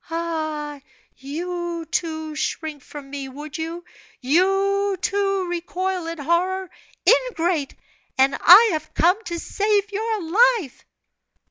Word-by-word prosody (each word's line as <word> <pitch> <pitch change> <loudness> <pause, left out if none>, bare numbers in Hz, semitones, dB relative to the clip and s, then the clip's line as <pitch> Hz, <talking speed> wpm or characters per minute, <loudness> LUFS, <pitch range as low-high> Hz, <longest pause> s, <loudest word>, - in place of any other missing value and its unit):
"Ah! 310 -3 -3 0.3
you, 340 +4 -5
too, 315 -3 -2
shrink 310 -1 -3
from 285 +1 -10
me, 275 -2 -5
would 290 +2 -9
you? 335 +2 -5 0.3
You, 390 +7 +2
too, 390 -1 0
recoil 350 +1 -3
in 335 0 -5
horror! 360 +5 0 0.4
Ingrate! 355 - +2 0.4
And 265 +1 +4
I 425 +6 +9
have 310 -2 -4
come 365 +6 +3
to 340 - -4
save 410 +3 0
your 435 0 -2
life!" 400 - +2
340 Hz, 115 wpm, -22 LUFS, 310-390 Hz, 0.4 s, I